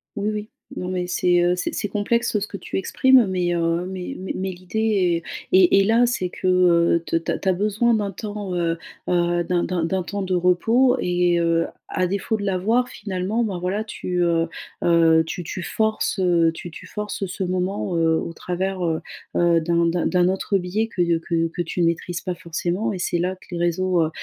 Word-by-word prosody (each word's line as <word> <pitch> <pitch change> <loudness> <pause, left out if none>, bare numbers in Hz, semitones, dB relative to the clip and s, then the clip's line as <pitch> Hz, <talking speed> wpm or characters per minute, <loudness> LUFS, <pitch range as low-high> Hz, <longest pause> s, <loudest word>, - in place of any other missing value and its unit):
Oui, 205 0 -1
oui, 210 0 -5 0.3
non 180 - -4
mais 180 -1 -2
c'est, 180 0 +2
heu, 175 +1 +3
c'est 180 - -3
c'est 205 - -2
complexe 215 +2 0
ce 205 - -4
que 200 - -7
tu 185 - -5
exprimes 255 +4 +4
mais 180 -2 0
heu 170 +1 0
mais 185 -1 -5
mais 190 - -5
mais 190 0 -2
l'idée 185 -2 0 0.3
est - - +6
est 190 +1 +6
est - - +3
là 230 +4 +4
c'est 185 -7 -1
que, 185 - -4
heu, 170 -2 +4
te - - -2
tu 165 - -3
as - - -1
tu 195 - -6
as - - +4
besoin 215 +5 +1
d'un 205 -3 0
temps, 205 -2 -5
heu 170 -1 0 0.3
heu, 175 -1 +2
d'un 175 0 0
d'un 175 -2 -1
d'un 185 +2 -1
temps 200 +2 -4
de 185 0 -2
repos 225 +9 +3
et 175 -1 +2
heu, 165 0 +2 0.2
à 185 - 0
défaut 200 +4 -1
de 205 - -4
l'avoir 210 +6 +1
finalement, 200 +3 -2
bah, 190 -4 -3
voilà 195 +4 -1
tu, 180 -4 -3
heu 165 -1 +2 0.4
heu 165 -1 +5
tu 175 +2 -5
tu 185 +3 -5
forces, 220 +1 -1
heu, 170 -3 +3
tu 175 - -8
tu - - -11
forces 210 -1 -4
ce 190 +1 -4
moment, 185 0 -2
heu, 165 -1 +3
au 165 - -5
travers, 185 +2 -3
heu 160 -1 0 0.4
heu, 170 -1 +4
d'un 170 +1 +1
d'un 170 0 0
d'un 180 -1 +3
autre 195 +1 0
biais 195 +5 -1
que 185 - -2
de 170 -1 +2
que 165 0 0
que 175 - -4
tu 170 +1 -4
ne 170 - +4
maîtrises 170 +1 -1
pas 180 -2 -3
forcément 175 +4 -2
et 195 - -4
c'est 175 - -1
là 180 +2 -1
que - - -20
les 175 - -3
réseaux, 175 +1 +1
heu 155 - 0
180 Hz, 220 wpm, -22 LUFS, 175-200 Hz, 0.4 s, est